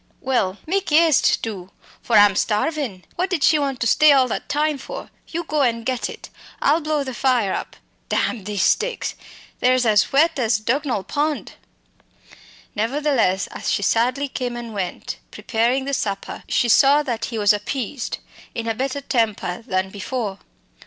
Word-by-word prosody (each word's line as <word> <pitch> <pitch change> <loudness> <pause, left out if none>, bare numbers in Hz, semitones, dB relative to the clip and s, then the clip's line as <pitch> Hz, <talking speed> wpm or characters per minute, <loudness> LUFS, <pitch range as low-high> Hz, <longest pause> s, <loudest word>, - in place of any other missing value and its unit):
Well, 225 -8 0
mak' 390 +4 0
eëaste, 320 -2 +4
do, 195 -5 -5 0.3
for 235 - 0
I'm 205 -1 +6
starvin'. 215 - -1
What 365 +2 0
did 365 -6 -1
she 310 - +5
want 275 -3 -2
to - - +1
stay 300 +6 +6
all 265 -2 +5
that - - -4
time 295 0 0
for? - - -8 0.2
You 340 +1 -4
go 305 -2 -1
and 230 -3 +1
get 255 -1 -1
it. - - -10 0.3
I'll 305 +4 +3
blow 305 -1 0
the 260 -1 -5
fire 240 -6 +1
up - - -5 0.3
damn 220 -7 -1
these 205 -3 -1
sticks! 480 +2 +1 0.5
they're 255 +1 +4
as 220 -6 +3
wet 290 +1 +3
as 225 -3 +2
Dugnall 250 -1 -1
pond." 295 +4 -2 1.2
Nevertheless, 230 -4 +1
as - - -4
she 200 - 0
sadly 250 +7 +1
came 250 -2 -4
and 235 -2 -7
went, 190 -3 -4
preparing 240 +4 0
the 280 - -3
supper, 200 -6 -3
she 240 - +1
saw 280 +5 +5
that 235 -5 -2
he 230 - -5
was 205 -1 +4
appeased, 235 +4 -3 0.4
in 230 0 -3
a 225 - +1
better 270 +4 -3
temper 225 -7 -1
than 185 -2 -1
before. 205 0 -4
250 Hz, 165 wpm, -22 LUFS, 215-285 Hz, 1.2 s, I'm